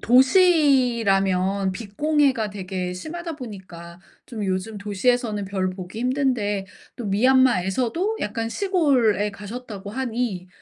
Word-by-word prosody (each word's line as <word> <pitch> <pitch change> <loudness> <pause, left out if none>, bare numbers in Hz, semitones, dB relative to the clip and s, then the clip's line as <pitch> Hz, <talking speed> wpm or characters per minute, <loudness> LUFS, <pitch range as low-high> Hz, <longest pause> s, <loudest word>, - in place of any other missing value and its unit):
도시라면 235 - +3
빛 200 +1 -9
공해가 290 -7 +2
되게 185 -2 -4
심하다 330 - -6
보니까 185 - -10 0.3
좀 220 -4 -5
요즘 190 +3 -3
도시에서는 210 +1 0
별 190 -1 -2
보기 185 +2 -8
힘든데 245 -7 0 0.3
또 240 - -6
미얀마에서도 255 - +2
약간 225 +2 -2
시골에 260 - +2
가셨다고 205 -1 -8
하니 230 -6 -3
220 Hz, 270 characters per minute, -23 LUFS, 195-260 Hz, 0.3 s, 도시라면